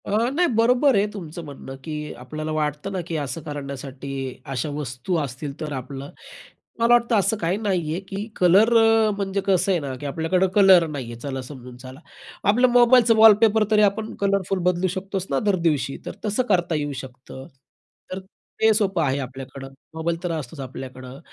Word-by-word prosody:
अ, 220 +4 +1
नाही 350 +4 +2
बरोबर 250 +4 +4
आहे 200 0 +3
तुमचं 170 -3 -7
म्हणणं 135 -2 -9
की 150 0 -5
आपल्याला 155 +5 -6
वाटतं 150 +4 -2
ना, 185 - -2
की 165 - -4
असं 145 +1 -4
करण्यासाठी 140 -2 -7 0.4
अशा 130 +4 -2
वस्तू 145 +4 -3
असतील, 140 +2 -7
तर 155 -1 -5
आपलं 135 +1 -7 0.7
मला 230 - +3
वाटतं 235 -1 +3
असं 200 +3 +1
काही 180 -1 -1
नाहीये 180 -6 -1
की 200 +2 -4
कलर 195 +6 +4
अ, 225 -1 +4
म्हणजे 200 0 -2
कसं 190 0 +2
आहे 180 - +2
ना 135 -2 -4
की - - -6
आपल्याकडं 165 +6 +1
कलर 190 -4 +6
नाही 145 -5 -5
आहे. 115 - -9
चला 135 -1 -4
समजून 125 -2 -11
चला, 130 +2 -11 0.5
आपलं 245 +5 +5
मोबाईलचं 240 -1 +6
वॉलपेपर 220 0 +6
तरी 210 -1 +5
आपण 210 +2 +1
कलरफुल 195 -1 0
बदलू 180 +1 0
शकतोच 195 0 -4
ना 135 - +2
दरदिवशी, 165 -7 0
तर - - -6
तसं 215 +4 0
करता 175 -4 +2
येऊ 145 -1 -2
शकतं. 130 0 -11 0.7
तर 185 - -4 0.4
ते 220 0 +6
सोपं 195 -5 +1
आहे 140 -1 0
आपल्याकडं, 135 +1 -8 0.3
मोबाईल 165 +2 -2
तर 175 - -1
असतोच 155 -3 -5
आपल्याकडं. 130 0 -8
165 Hz, 175 wpm, -23 LUFS, 140-200 Hz, 0.7 s, कलर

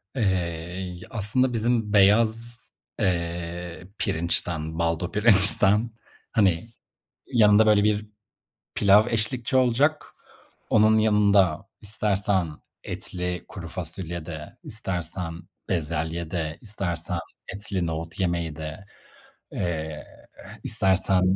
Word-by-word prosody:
Eee, 90 -5 -2
y 90 -2 -7
aslında 120 +5 +2
bizim 115 -2 0
beyaz, 110 +3 +3 0.4
eee, 85 0 -3
pirinçten, 80 -1 -1
baldo 85 +1 -1
pirinçten, 105 +1 +5 0.4
hani, 100 -3 +1 0.6
yanında, 110 -2 +5
böyle, 105 -1 +4
bir 105 0 0 0.7
pilav 105 +2 +4
eşlikçi 115 +3 -1
olacak. 130 +5 +2 0.6
Onun 110 0 +4
yanında 100 -5 +2
istersen 100 -3 +1 0.4
etli 90 0 -5
kuru 90 -4 -9
fasulye 85 -1 -3
de, 75 -3 -9
istersen 90 -4 -1 0.3
bezelye 80 -1 -3
de, 80 -2 -4
istersen 100 -6 -1 0.4
etli 100 -3 -3
nohut 80 +2 -6
yemeği 85 -4 -2
de, 80 +4 -8 0.7
eee, 80 - -4 0.4
eh, - - -12
istersen 95 -1 +4
95 Hz, 95 wpm, -24 LUFS, 85-105 Hz, 0.7 s, pirinçten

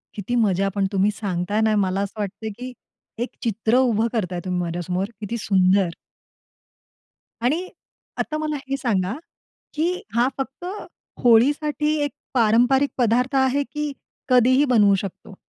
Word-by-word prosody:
किती 215 +4 -3
मजा 195 -4 +2
पण 200 -1 +1
तुम्ही 195 +1 +2
सांगताय 200 0 -2
ना 220 -1 +3
मला 195 -1 +1
असं 200 +2 -5
वाटतंय, 205 +2 -4
की 250 +4 -8 0.5
एक 245 - -5
चित्र 225 +1 +1
उभं 230 -3 +3
करताय 180 -5 -2
तुम्ही 180 -1 -1
माझ्यासमोर 175 +2 -2 0.2
किती 220 +3 -3
सुंदर. 190 -3 +2 1.5
आणि 320 +10 0 0.5
आता 305 - -2
मला 310 -1 -2
हे 275 - 0
सांगा, 205 -6 0 0.6
की 345 +4 0
हा 240 +2 +3
फक्त 270 +5 -5 0.6
होळीसाठी 290 +5 +3
एक 290 - -2 0.2
पारंपरिक 245 +4 +4
पदार्थ 250 +3 +2
आहे, 265 +1 +2
की 295 +2 -4 0.4
कधीही 255 +2 +5
बनवू 215 -7 +4
शकतो? 195 +1 -7
230 Hz, 135 wpm, -23 LUFS, 195-265 Hz, 1.5 s, कधीही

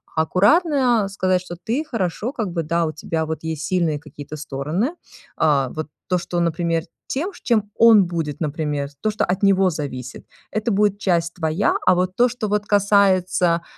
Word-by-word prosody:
Аккуратно 235 - +3
сказать, 185 -2 0
что: 180 -1 -8
ты, 245 - -1
хорошо, 220 - -2
как 220 -8 -3
бы, 170 -1 -1
да, 170 +2 0
у 155 - -2
тебя 160 +1 -3
вот 160 0 -4
есть 160 -2 -4
сильные 165 -4 0
какие-то 145 0 -10
стороны. 150 - -2 0.4
А, 140 -5 +2
вот 155 +2 -5 0.2
то, 180 - +1
что, 175 0 -3
например, 170 -1 0 0.2
тем, 330 +9 -2
чем 215 -4 +1
он 225 -4 +6
будет, 165 -4 -4
например, 150 -2 -2
то, 215 - +1
что 215 - 0
от 180 +1 -1
него 195 -1 +4
зависит- 130 -5 -6 0.2
это 215 +2 -1
будет 205 0 +2
часть 170 -4 0
твоя, 165 +3 0
а 185 - +6
вот 185 +1 -1
то, 245 +3 +4
что 240 -2 -4
вот 210 0 0
касается, 185 -4 +3
180 Hz, 175 wpm, -21 LUFS, 160-205 Hz, 0.4 s, он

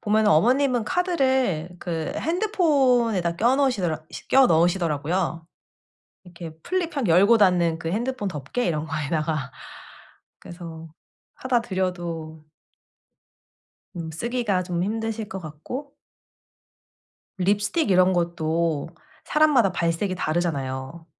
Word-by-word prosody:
보면 215 +1 +2
어머님은 245 - +3
카드를 260 - 0
그 165 -2 -3
핸드폰에다 270 - +1
껴 240 +7 +3
넣으시더라 185 - 0 0.2
껴 265 -1 +6
넣으시더라고요. 165 -1 0 0.8
이렇게 170 -3 -10
플립 350 -4 -2
확 260 -6 0
열고 200 +7 +5
닫는 175 -5 +3
그 165 - -4
핸드폰 240 +1 -2
덮개 165 - -3
이런 155 -3 -1
거에다가. 155 -2 -2 0.9
그래서 165 -2 -10 0.5
사다 255 -2 +1
드려도 175 -6 -4 1.5
음 165 -1 -5
쓰기가 210 +1 -1
좀 175 -1 -2
힘드실 225 +1 -3
것 190 - -5
같고 190 - -8 1.4
립스틱 205 - +1
이런 185 0 +4
것도 170 -3 -1 0.4
사람마다 295 -10 +3
발색이 170 +3 -1
다르잖아요. 155 -3 -3
185 Hz, 250 characters per minute, -24 LUFS, 165-240 Hz, 1.5 s, 껴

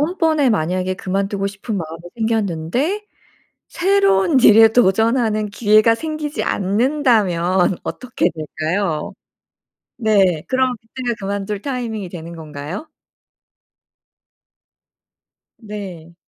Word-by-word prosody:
다음번에 315 -4 +2
만약에 185 -1 0
그만두고 195 +1 -2
싶은 200 +2 -5
마음이 165 -1 -6
생겼는데 225 - -1 0.6
새로운 390 -5 +3
일에 225 -1 +8
도전하는 220 0 +2
기회가 215 +2 +4
생기지 305 +2 -4
않는다면 195 - +1
어떻게 250 -8 -1
될까요? 155 +2 -3 0.9
네 195 -8 +2
그럼 260 -1 +1
그때가 240 +1 -4
그만둘 200 +1 -3
타이밍이 230 -8 -4
되는 170 -1 -8
건가요? 155 - -7 2.7
네. 195 -7 -8
210 Hz, 235 characters per minute, -19 LUFS, 185-250 Hz, 2.7 s, 일에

